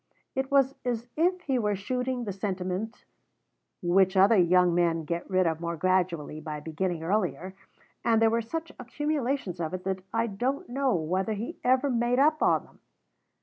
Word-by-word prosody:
It 265 0 -2
was 275 -1 +3
as 240 -2 -2
if 360 +3 +1
he 265 -6 0
were 210 -2 0
shooting 250 +5 -2
the 205 -4 -4
sentiment 190 +3 -4 0.8
which 190 +2 +3
other 200 +4 +6
young 180 -1 +4
men 170 -2 +1
get 170 +2 -4
rid 185 -1 +2
of 160 -1 -1
more 170 0 -3
gradually 175 -4 0
by 155 -1 -5
beginning 160 +2 -3
earlier, 185 0 -1 0.5
and 225 -1 +3
there 225 0 +4
were 230 +1 +1
such 325 +8 -5
accumulations 270 - -2
of 165 +2 -2
it 185 - -7
that 190 0 -2
I 230 0 +1
don't 245 +6 -2
know 265 -1 +1
whether 185 +6 -1
he 215 +3 -5
ever 260 +2 +3
made 240 +1 +1
up 305 +3 +3
on - - +3
them. - - -22
200 Hz, 175 wpm, -28 LUFS, 180-250 Hz, 0.8 s, other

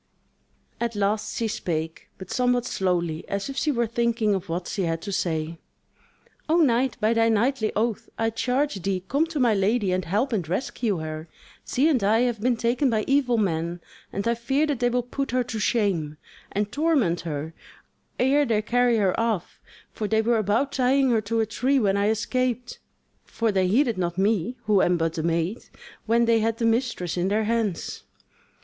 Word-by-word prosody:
At 235 -1 -2
last 210 +1 -1
she 230 - 0
spake, 160 -5 -4
but 190 - -10
somewhat 245 -1 +1
slowly, 175 -7 -1
as 200 +5 -2
if 275 - -5
she 300 - +1
were 240 -3 +1
thinking 230 -1 +1
of 190 -4 -3
what 175 +2 -3
she 200 - -3
had 165 -1 -1
to 200 - -4
say: 165 -3 -2 0.9
"O 325 - +4
knight, 260 -5 +2
by 215 +2 +2
thy 230 0 +3
knightly 225 +1 +1
oath 225 +1 -1
I 225 0 0
charge 250 0 -1
thee 185 0 -2
come 290 - +1
to 325 -3 -4
my 240 -4 +4
lady 205 0 +1
and 185 0 0
help 215 +10 0
and 180 -7 -2
rescue 210 +1 -1
her: 155 0 -6 0.4
she 275 +5 +1
and 265 -10 +2
I 220 +3 +3
have 240 -4 0
been 245 0 +1
taken 240 +4 +1
by 220 -2 +1
evil 270 -3 +2
men, 170 -4 -1 0.3
and 200 +3 -3
I 235 - +3
fear 270 +6 0
that 290 -5 -2
they 245 0 +2
will 245 0 0
put 275 +3 -4
her 250 +1 +1
to 225 -2 -5
shame, 190 -10 0 0.3
and 205 +1 -1
torment 285 - +1
her, 160 -1 -5 0.7
ere 275 +4 +4
they 220 -5 +1
carry 245 +1 +2
her 195 -4 +2
off; 225 -6 -2 0.3
for 215 - -3
they 220 +1 +2
were 230 0 +2
about 220 +7 +1
tying 265 0 +2
her 225 -2 +2
to 225 +2 0
a - - +1
tree 255 +6 +1
when 200 -6 +2
I 200 +1 +2
escaped: 245 +2 -1 0.4
for 230 -1 -1
they 190 -2 +2
heeded 235 +1 +2
not 175 -1 -2
me 205 +3 +1
who 210 -3 +3
am 175 0 +3
but 165 -1 0
the 165 - -3
maid, 170 +6 -1 0.5
when 235 +1 +3
they 230 -1 +3
had 225 +1 0
the 230 - -1
mistress 225 -7 0
in 175 +1 +1
their 210 +3 +1
hands." 220 -5 -2
220 Hz, 195 wpm, -25 LUFS, 190-245 Hz, 0.9 s, O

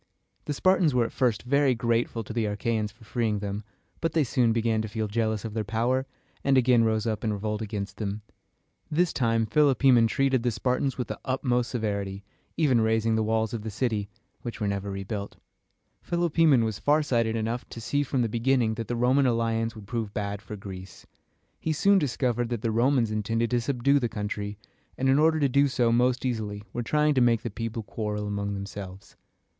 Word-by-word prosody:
The 145 - -2
Spartans 180 -4 +3
were 120 -2 +3
at - - -5
first 120 -5 0
very 140 +1 +3
grateful 115 -1 0
to 110 - -8
the 115 -1 0
Achæans 105 +1 -1
for 110 +2 -20
freeing 110 -1 -1
them, 100 +1 -4 0.4
but 165 - -1
they 160 - +3
soon 120 -2 +2
began 115 -1 +1
to 110 - -4
feel 110 0 -3
jealous 110 0 -1
of 110 - -5
their 110 -1 -1
power, 120 +5 0 0.4
and 135 -1 +3
again 125 -2 +4
rose 110 -1 +1
up 110 -2 -2
in 110 - 0
revolt 105 +1 -3
against 100 -2 -5
them. 105 0 -4 0.7
This 170 +3 +1
time 115 -2 +1
Philopoemen 130 -2 +4
treated 135 +1 +1
the 120 - +1
Spartans 125 +4 -1
with 125 - -2
the - - -5
utmost 125 -2 0
severity, 100 -4 -3 0.3
even 135 -7 +3
razing 110 0 +2
the 110 - +1
walls 110 0 0
of 115 - -3
the 110 - -5
city, 105 -2 -1 0.3
which 120 0 -6
were 105 - -1
never 100 0 -2
rebuilt. 100 +1 -5 0.7
Philopoemen 165 -6 +3
was 110 -2 -2
farsighted 130 -6 +2
enough 115 +2 -3
to - - -8
see 125 +5 0
from 135 -3 0
the - - +1
beginning 120 0 +1
that 115 -1 -5
the 120 - -2
Roman 130 +3 +3
alliance 115 -1 0
would 105 -2 -10
prove 110 -2 -4
bad 100 -1 -3
for 110 - -8
Greece. 95 -2 -10 0.5
He 160 - -1
soon 200 +6 +4
discovered 120 -4 0
that 120 -3 -3
the 115 - +1
Romans 120 0 +2
intended 115 +2 -1
to 120 -1 +2
subdue 140 +3 +2
the 120 -3 -1
country, 105 -1 -4 0.4
and 135 +1 +1
in 135 +2 +4
order 160 +1 +4
to 145 - +3
do 140 +2 +3
so 125 -3 +1
most 125 +2 +2
easily 105 -4 -3
were 120 - -2
trying 150 +5 +2
to 130 - +2
make 120 -2 +3
the 120 - -4
people 115 +1 -4
quarrel 105 -1 -3
among 100 0 -2
themselves. 100 -1 -8
115 Hz, 200 wpm, -27 LUFS, 105-130 Hz, 0.7 s, again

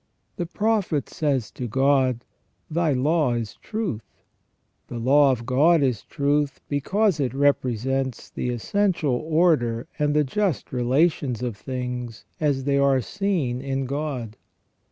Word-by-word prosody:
* - - -47
The 175 -3 -2
Prophet 200 -6 0
says 140 -7 -1
to 125 - -5
God: 130 0 +2 0.2
" - - -34
Thy 165 -1 +1
law 145 0 +2
is 115 -3 -4
truth 210 - -3 0.5
". - - -47
The 120 - -6
law 135 +4 +4
of 120 -2 -3
God 145 +6 +4
is 125 -7 0
truth 145 -1 0
because 185 +6 +1
it 130 -3 -1
represents 135 -2 0
the 125 - -3
essential 165 - 0
order 155 -5 +1
and 150 0 +1
the 150 - +4
just 185 - -1
relations 125 -1 +1
of 120 -4 -2
things 125 0 -5
as 145 -3 +1
they 140 0 +1
are 140 -1 +4
seen 165 - -1
in 135 0 -2
God. 135 -5 -4
140 Hz, 145 wpm, -24 LUFS, 125-155 Hz, 0.5 s, law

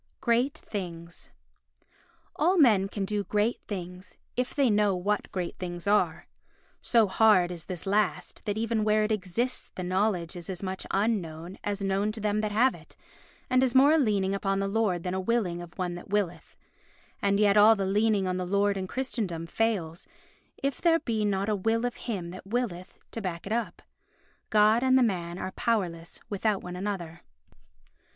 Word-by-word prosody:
Great 245 +4 +1
Things 175 - -7 1.1
All 350 +5 +2
men 215 - +5
can 200 0 -3
do 205 +1 -1
great 210 +4 0
things, 180 -2 -7 0.2
if 250 0 -2
they 280 -2 +3
know 210 -3 +3
what 200 +3 -1
great 180 -2 -4
things 175 -1 -5
are. 205 +1 +2 0.6
So 230 -2 +4
hard 190 -3 +4
is 170 -2 -7
this 180 -3 -6
last 195 -5 -1
that 205 0 -1
even 225 -1 0
where 215 0 +3
it 215 - -1
exists 215 +5 -2
the 185 - -4
knowledge 185 -2 0
is 175 0 -8
as 185 0 -5
much 190 0 -4
unknown 185 -4 -2
as 205 -1 -2
known 195 +2 +1
to 225 - -5
them 210 0 0
that 215 -1 -2
have 240 +5 +3
it - - -15 0.5
and 255 0 +3
is 260 -1 +1
more 275 +3 +7
a 320 - +4
leaning 200 -7 +1
upon 195 0 0
the 195 0 0
Lord 195 -4 0
than 180 - -2
a 190 - -1
willing 185 -5 0
of 175 0 -11
one 180 -2 -2
that 175 +2 -9
willeth. 200 -4 -2 0.7
And 200 0 +2
yet 205 -1 +4
all 215 +2 +7
the 195 -2 -2
leaning 205 0 +2
on 185 0 -1
the 185 - -2
Lord 200 +1 +2
in 190 -1 -3
Christendom 210 -9 -3
fails 180 -4 -2 0.5
if 275 -1 -3
there 335 -1 +4
be 225 -8 -2
not 200 -1 0
a 215 - +1
will 225 +4 0
of 245 - -3
him 180 -6 -3
that 185 +1 -10
willeth 200 -5 -3
to 225 - -5
back 175 -4 -4
it 205 - -2
up. 235 0 -3 0.7
God 215 +2 +4
and 260 0 +4
the 260 - +5
man 175 -6 -1
are 190 - -4
powerless 175 -9 -2
without 205 0 -1
one 180 0 -6
another. 180 -4 -4
200 Hz, 185 wpm, -28 LUFS, 185-225 Hz, 1.1 s, more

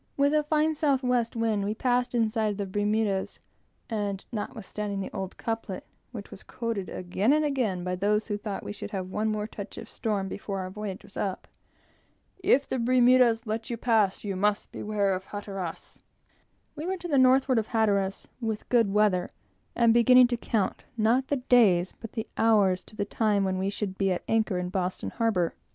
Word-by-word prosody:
With 285 +1 +3
a 305 - +4
fine 305 +1 +1
south 285 -4 +1
west 245 -2 +1
wind, 225 -3 0
we 210 +2 -2
passed 245 +1 0
inside 220 -2 +1
of - - -9
the 200 - -2
Bermudas; 205 0 0 0.5
and 205 -3 -3
notwithstanding 210 -2 -4
the 195 - -4
old 190 -1 -5
couplet, 225 -4 -4 0.3
which 210 -5 -8
was - - -10
quoted 230 -6 -4
again 185 +6 0
and 305 +1 +3
again 235 -11 -1
by 180 0 -2
those 210 +3 +1
who 210 - -2
thought 205 -1 -5
we - - -5
should 205 - -7
have 190 -3 -4
one 215 +2 0
more 210 -1 -1
touch 205 -2 -8
of - - -6
a - - -14
storm 205 -3 -2
before 195 0 -5
our 185 0 -5
voyage 205 -1 -6
was - - -16
up, 195 -2 -3 0.9
"If 280 -7 +3
the 260 - -2
Bermudas 245 -1 +4
let 220 +1 -3
you 235 - -3
pass, 220 -5 +2
You 200 -2 -3
must 205 +2 0
beware 205 -2 0
of 185 +1 -4
Hatteras 195 -5 -6 0.4
" - - -41
we 310 +3 -5
were 380 +1 -1
to 350 0 -7
the 285 -5 +3
northward 260 -1 +4
of 220 - -3
Hatteras, 200 -4 0
with 220 -2 -3
good 230 -5 +3
weather, 205 -3 +2 0.5
and 235 -1 +4
beginning 250 +2 +7
to 245 - +1
count, 220 -4 -1
not 235 +4 +2
the 285 - +1
days, 225 -9 +4
but 225 - -9
the 220 - -3
hours, 200 -5 +3
to - - -14
the 205 - -1
time 205 -1 +1
when 190 -1 -1
we 190 +1 0
should 200 -2 -4
be 195 -1 +2
at 180 - -2
anchor 220 -4 +1
in 180 0 -2
Boston 185 -1 -2
harbor. 210 -8 0
215 Hz, 200 wpm, -27 LUFS, 195-235 Hz, 0.9 s, beginning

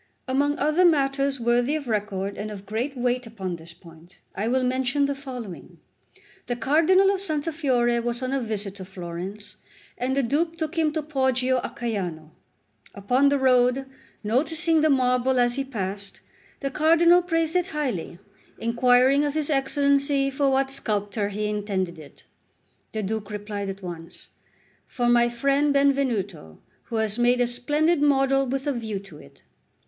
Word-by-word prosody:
Among 285 +3 +1
other 305 +4 +2
matters 275 -4 +2
worthy 240 +4 +1
of 295 -4 -4
record 205 -3 -2
and 210 +1 -5
of 205 -2 -9
great 240 +7 -3
weight 245 0 -1
upon 190 -5 -5
this 165 +1 -11
point, 170 +1 -17 0.2
I 210 +3 -2
will 255 +2 +1
mention 260 +2 +1
the 280 - -1
following. 250 -9 -9 0.7
The 245 - -1
Cardinal 330 +10 +4
of 390 -1 -2
Santa 315 -4 -1
Fiore 245 -6 +1
was 240 +2 -3
on 255 +1 -2
a 275 - 0
visit 210 -4 -3
to 190 - -8
Florence, 185 +3 -7 0.4
and 260 +2 -1
the 275 - +2
Duke 325 +7 0
took 320 +1 -3
him 320 -2 +2
to 315 -1 -2
Poggio 260 -3 +1
a - - -3
Caiano. 180 -10 -4 0.6
Upon 250 +8 +2
the 285 - +2
road, 255 0 +3 0.4
noticing 315 +8 +1
the 310 - +3
marble 255 -1 +2
as 240 0 +3
he 275 - -1
passed, 200 -6 -5 0.4
the 275 -1 -2
Cardinal 335 +4 +5
praised 330 -1 0
it 360 0 +2
highly, 260 - -3 0.4
inquiring 250 +4 +3
of 290 0 -2
his 310 -1 0
Excellency 280 0 +2
for 275 +1 +1
what 270 0 +1
sculptor 205 -5 -1
he 210 +1 -3
intended 200 -5 -2
it. 150 -2 -14 0.7
The 215 -1 -3
Duke 215 +1 -3
replied 205 -1 -5
at 195 0 -7
once: 170 -2 -9 0.6
"For 245 -2 -1
my 240 0 +4
friend 275 +4 +1
Benvenuto, 240 - 0 0.3
who 230 - -6
has 220 0 +1
made 245 +1 +3
a 245 - +3
splendid 295 +7 +1
model 270 -1 +3
with 270 +2 -3
a 290 - 0
view 220 -4 -4
to 190 -6 -11
it." 70 - -18
250 Hz, 165 wpm, -24 LUFS, 210-280 Hz, 0.7 s, Cardinal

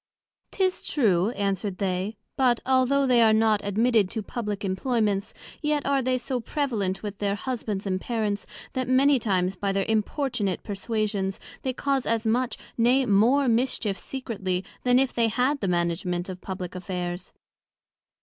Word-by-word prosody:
'Tis 375 -1 0
true, 200 - +2
answer'd 200 -1 -1
they; 195 +2 -2 0.2
but, 250 -3 +3
although 265 +2 +3
they 250 -2 +4
are 225 -1 +6
not 220 -1 +3
admitted 215 0 +2
to 220 +1 -4
publick 210 -3 -4
Employments, 205 0 0 0.3
yet 300 -2 0
are 275 -1 +2
they 255 0 +1
so 250 0 -2
prevalent 225 -8 -2
with 205 -1 -5
their 200 -1 0
Husbands 215 -4 -3
and 185 -1 -1
Parents, 215 -4 -2 0.3
that 255 -1 -2
many 270 +1 +5
times 190 -4 0
by 200 -1 -1
their 195 0 0
importunate 220 -2 -1
perswasions, 205 -2 -2 0.2
they 260 - -1
cause 275 0 0
as 230 0 0
much, 240 +3 +1 0.2
nay, 255 +3 +4
more 240 +7 +4
mischief 230 -4 0
secretly, 200 -8 -3 0.2
then 250 0 +4
if 265 0 +2
they 235 -1 +2
had 255 +6 +1
the 200 - -2
management 175 +1 -1
of 185 -1 -7
publick 185 -2 -5
Affairs. 180 -1 -4
220 Hz, 155 wpm, -26 LUFS, 195-255 Hz, 0.3 s, are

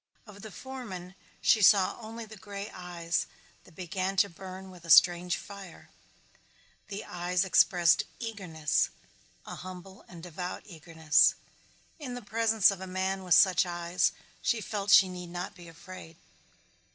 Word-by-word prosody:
Of 205 -2 -13
the 220 - -9
foreman 200 -5 -8 0.3
she 220 - +4
saw 195 -1 +5
only 225 0 -8
the 220 0 -12
gray 200 +1 -8
eyes 175 -2 -3 0.4
that 170 - -19
began 185 +2 -3
to 200 +1 +3
burn 190 +2 -10
with 180 -2 -15
a 170 - -11
strange 175 +1 +5
fire. 200 -1 -11 1.0
The 205 0 -6
eyes 180 +1 -1
expressed 175 -2 +4
eagerness, 180 - -1 0.6
a - - -8
humble 185 +1 -10
and 170 -2 -12
devout 180 +1 -6
eagerness. 160 -3 +2 0.6
In 255 -5 -6
the 245 - -8
presence 220 -1 +3
of 195 -1 -7
a 190 - -6
man 190 +1 -2
with 180 -2 +4
such 190 -2 +5
eyes 175 0 0 0.3
she 235 - +1
felt 205 -1 -4
she 195 -1 +8
need 180 -1 -8
not 175 +1 -5
be 175 -2 -14
afraid. 165 0 -12
185 Hz, 150 wpm, -29 LUFS, 175-200 Hz, 1.0 s, she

